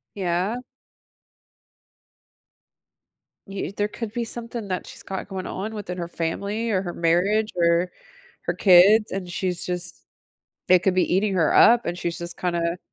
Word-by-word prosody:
Yeah? 185 Hz, +4 st, -1 dB, 2.9 s
Y 195 Hz, -1 st, -4 dB
there 205 Hz, 0 st, +1 dB
could 225 Hz, 0 st, -6 dB
be 240 Hz, -1 st, -2 dB
something 230 Hz, -2 st, -6 dB
that 185 Hz, -1 st, -3 dB
she's -, -, -12 dB
got 190 Hz, -1 st, -5 dB
going 190 Hz, -1 st, -5 dB
on 215 Hz, +4 st, -5 dB
within 185 Hz, -4 st, -6 dB
her 170 Hz, -1 st, -4 dB
family, 200 Hz, +8 st, -3 dB
or 190 Hz, -4 st, +1 dB
her 175 Hz, -2 st, -5 dB
marriage, 195 Hz, +6 st, +1 dB
or 170 Hz, +1 st, +2 dB, 0.5 s
her -, -, -2 dB
kids, 200 Hz, +4 st, +6 dB
and 190 Hz, -1 st, -4 dB
she's 180 Hz, -1 st, -3 dB
just 180 Hz, -1 st, -5 dB, 0.7 s
it 185 Hz, 0 st, +6 dB
could 190 Hz, -, +2 dB
be 185 Hz, -, +1 dB
eating 195 Hz, +1 st, +1 dB
her 165 Hz, -4 st, +2 dB
up, 235 Hz, +1 st, +6 dB
and 175 Hz, +1 st, -2 dB
she's 170 Hz, -1 st, -3 dB
just, 170 Hz, 0 st, -7 dB
kinda 170 Hz, -1 st, -1 dB
185 Hz, 155 wpm, -24 LUFS, 175-210 Hz, 2.9 s, kids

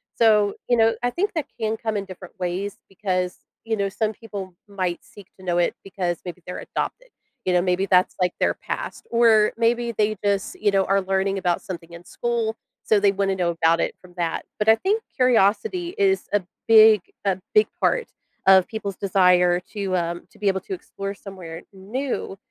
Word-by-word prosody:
So, 210 Hz, -3 st, +4 dB
you 245 Hz, -, +4 dB
know, 225 Hz, -1 st, +4 dB
I 245 Hz, -, +1 dB
think 405 Hz, -, -1 dB
that 315 Hz, -5 st, -2 dB
can 220 Hz, 0 st, -1 dB
come 220 Hz, -1 st, -3 dB
in 200 Hz, -1 st, -2 dB
different 185 Hz, -1 st, -11 dB
ways 185 Hz, +3 st, -3 dB
because, 185 Hz, -2 st, -2 dB, 0.3 s
you 225 Hz, -1 st, -1 dB
know, 200 Hz, -1 st, 0 dB
some 215 Hz, +2 st, -1 dB
people 200 Hz, -5 st, -8 dB
might 185 Hz, -4 st, -3 dB
seek 215 Hz, -4 st, -15 dB
to 185 Hz, -, -13 dB
know 175 Hz, -1 st, 0 dB
it 175 Hz, -, +1 dB
because 180 Hz, -3 st, -3 dB
maybe 180 Hz, 0 st, -7 dB
they're 180 Hz, -, -6 dB
adopted, -, -, -4 dB, 0.4 s
you 185 Hz, -, +1 dB
know, 180 Hz, -, +4 dB
maybe 180 Hz, +1 st, +1 dB
that's, 185 Hz, -1 st, +3 dB
like, 180 Hz, -1 st, +1 dB
their -, -, +2 dB
past; -, -, -6 dB
or 225 Hz, -2 st, +5 dB
maybe 235 Hz, +1 st, +1 dB
they 215 Hz, 0 st, 0 dB
just, 200 Hz, -1 st, 0 dB
you 210 Hz, -1 st, +2 dB
know, 195 Hz, -1 st, +3 dB
are 195 Hz, 0 st, +2 dB
learning 195 Hz, +1 st, 0 dB
about 180 Hz, -2 st, 0 dB
something 170 Hz, -3 st, -8 dB
in 170 Hz, 0 st, -10 dB
school, 230 Hz, +1 st, -2 dB, 0.3 s
so 215 Hz, -, +3 dB
they 200 Hz, 0 st, +4 dB
wanna 195 Hz, -1 st, 0 dB
know 175 Hz, -2 st, 0 dB
about 165 Hz, 0 st, +2 dB
it -, -, -1 dB
from 180 Hz, -1 st, -16 dB
that. 170 Hz, -2 st, -2 dB
But 210 Hz, -, -1 dB
I 220 Hz, -, +8 dB
think 415 Hz, -, 0 dB
curiosity 255 Hz, -, +2 dB
is 390 Hz, -2 st, +2 dB
a 205 Hz, -, +3 dB, 0.3 s
big 220 Hz, -2 st, +8 dB, 0.2 s
a 190 Hz, -2 st, +1 dB, 0.2 s
big 425 Hz, -, +6 dB
part -, -, +1 dB, 0.4 s
of 190 Hz, -1 st, +7 dB
people's 210 Hz, -4 st, -5 dB
desire 180 Hz, -2 st, +4 dB
to, 195 Hz, 0 st, -4 dB
um, 170 Hz, -1 st, -2 dB
to -, -, -21 dB
be 205 Hz, -, -1 dB
able 190 Hz, -1 st, +2 dB
to -, -, -6 dB
explore 200 Hz, -, -6 dB
somewhere 180 Hz, -5 st, -9 dB
new, 205 Hz, +2 st, -4 dB
200 Hz, 195 wpm, -23 LUFS, 185-225 Hz, 0.4 s, I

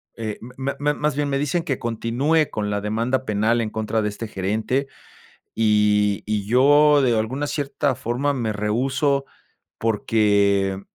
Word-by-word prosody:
m 110 Hz, -2 st, -5 dB, 0.2 s
me 135 Hz, +1 st, -3 dB
me 150 Hz, +1 st, +1 dB
más 150 Hz, -1 st, -1 dB
bien 145 Hz, 0 st, -1 dB
me 140 Hz, -, 0 dB
dicen 150 Hz, +5 st, -1 dB
que 140 Hz, -7 st, -2 dB
continúe, 125 Hz, +7 st, 0 dB
con 105 Hz, -1 st, -2 dB
la 105 Hz, 0 st, -1 dB
demanda 115 Hz, +5 st, -1 dB
penal 110 Hz, +2 st, +1 dB
en 110 Hz, -, -2 dB
contra 110 Hz, 0 st, -2 dB
de 105 Hz, -, -1 dB
este 110 Hz, +2 st, -6 dB
gerente, 110 Hz, +8 st, -1 dB, 0.7 s
y 105 Hz, -2 st, +2 dB
y 105 Hz, -1 st, -1 dB
yo 145 Hz, +5 st, +5 dB
de 120 Hz, -3 st, +2 dB
alguna 130 Hz, +7 st, -2 dB
cierta 140 Hz, -1 st, -1 dB
forma, 125 Hz, +6 st, -1 dB
me 115 Hz, -5 st, -2 dB
rehúso, 135 Hz, +7 st, 0 dB, 0.5 s
porque 100 Hz, -3 st, +1 dB
115 Hz, 155 wpm, -22 LUFS, 105-140 Hz, 0.7 s, yo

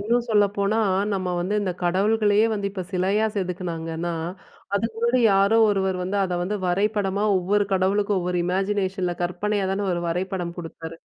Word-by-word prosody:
இன்னும் 235 Hz, +3 st, 0 dB
சொல்லப்போனா, 205 Hz, 0 st, +2 dB, 0.4 s
நம்ம 185 Hz, -1 st, -2 dB
வந்து 185 Hz, +4 st, -1 dB
இந்த 190 Hz, -2 st, -1 dB
கடவுள்களையே 205 Hz, +4 st, +3 dB
வந்து, 200 Hz, -2 st, -2 dB
இப்ப 190 Hz, -1 st, -5 dB
சிலையா 195 Hz, +4 st, +1 dB
செதுக்கினாங்கன்னா, 175 Hz, -3 st, -3 dB, 0.6 s
அதுக்கு 225 Hz, +3 st, -1 dB
முன்னாடி 235 Hz, +2 st, +2 dB
யாரோ 200 Hz, +3 st, +4 dB
ஒருவர் 190 Hz, -2 st, 0 dB
வந்து, 190 Hz, +3 st, -2 dB
அத 185 Hz, -, -3 dB
வந்து 205 Hz, +4 st, -2 dB
வரைபடமா 200 Hz, +2 st, 0 dB
ஒவ்வொரு 205 Hz, +3 st, +1 dB
கடவுளுக்கும் 195 Hz, +2 st, +2 dB
ஒவ்வொரு 180 Hz, 0 st, -1 dB
இமேஜினேஷன்ல 190 Hz, -1 st, -1 dB
கற்பனையா 195 Hz, +3 st, -1 dB
தானே 200 Hz, +1 st, -1 dB
ஒரு 175 Hz, -, -1 dB
வரைபடம் 180 Hz, 0 st, -3 dB
குடுத்தாரு. 165 Hz, -1 st, -8 dB
195 Hz, 145 wpm, -24 LUFS, 180-205 Hz, 0.6 s, யாரோ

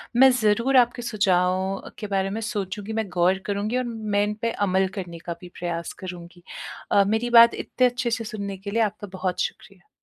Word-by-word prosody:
मैं 265 Hz, +2 st, +8 dB
ज़रूर 235 Hz, +5 st, +3 dB
आपके 240 Hz, -1 st, +3 dB
सुझावों 190 Hz, -3 st, 0 dB
के 210 Hz, -, -4 dB
बारे 195 Hz, -1 st, 0 dB
में 215 Hz, +3 st, -4 dB
सोचूँगी, 205 Hz, -1 st, -4 dB
मैं 220 Hz, -1 st, -1 dB
गौर 180 Hz, +1 st, +2 dB
करुँगी 205 Hz, +4 st, -1 dB
और 255 Hz, -, 0 dB
मैं 215 Hz, -3 st, -1 dB
इनपे 215 Hz, +2 st, -2 dB, 0.2 s
अमल 190 Hz, 0 st, +2 dB
करने 170 Hz, -2 st, -7 dB
का 170 Hz, -, -3 dB
भी 180 Hz, -, -10 dB
प्रयास 170 Hz, -1 st, -3 dB
करुँगी। 175 Hz, -1 st, -9 dB, 0.5 s
अ, 200 Hz, -, +6 dB
मेरी 220 Hz, +3 st, 0 dB
बात 235 Hz, 0 st, +8 dB
इतने 255 Hz, -1 st, +1 dB
अच्छे 245 Hz, -1 st, -2 dB
से 230 Hz, 0 st, -1 dB
सुनने 200 Hz, -2 st, -5 dB
के 200 Hz, +2 st, -7 dB
लिए 230 Hz, +2 st, +1 dB
आपका 210 Hz, -1 st, -3 dB
बहुत 180 Hz, -1 st, -1 dB
शुक्रिया। 185 Hz, -3 st, -6 dB
205 Hz, 190 wpm, -24 LUFS, 185-225 Hz, 0.5 s, मैं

